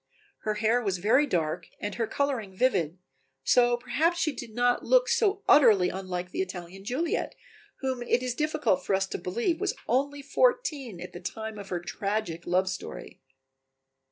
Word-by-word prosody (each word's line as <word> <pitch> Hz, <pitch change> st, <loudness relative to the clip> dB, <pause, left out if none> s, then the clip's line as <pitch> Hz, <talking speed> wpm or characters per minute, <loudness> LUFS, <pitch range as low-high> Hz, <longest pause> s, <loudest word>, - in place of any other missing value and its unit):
Her 215 Hz, -1 st, -2 dB
hair 225 Hz, +3 st, +2 dB
was 195 Hz, -5 st, -1 dB
very 225 Hz, +11 st, +3 dB
dark 160 Hz, -, -1 dB
and 205 Hz, 0 st, -3 dB
her 230 Hz, +1 st, -1 dB
coloring 235 Hz, -10 st, -2 dB
vivid, 180 Hz, -, +1 dB, 0.5 s
so 240 Hz, -, +4 dB
perhaps 275 Hz, +8 st, +1 dB
she 325 Hz, -2 st, +1 dB
did 240 Hz, -3 st, -8 dB
not 245 Hz, 0 st, +2 dB
look -, -, +4 dB
so 405 Hz, -2 st, +2 dB
utterly 215 Hz, -11 st, +6 dB
unlike 180 Hz, -1 st, -4 dB
the -, -, -1 dB
Italian 185 Hz, 0 st, -6 dB
Juliet, 275 Hz, +10 st, -1 dB, 0.5 s
whom 260 Hz, -2 st, -2 dB
it 240 Hz, +1 st, +1 dB
is 250 Hz, -1 st, -1 dB
difficult 300 Hz, -1 st, 0 dB
for 195 Hz, -, +1 dB
us 190 Hz, 0 st, +1 dB
to -, -, -5 dB
believe 235 Hz, -, -1 dB
was 400 Hz, -, 0 dB
only 280 Hz, +3 st, 0 dB
fourteen 290 Hz, -, +1 dB
at -, -, -8 dB
the 175 Hz, -, -7 dB
time 220 Hz, +4 st, -5 dB
of 200 Hz, -, -9 dB
her 180 Hz, -, -1 dB
tragic 180 Hz, -1 st, -3 dB
love 185 Hz, +2 st, +2 dB
story. 185 Hz, 0 st, -6 dB
230 Hz, 170 wpm, -28 LUFS, 190-280 Hz, 0.5 s, utterly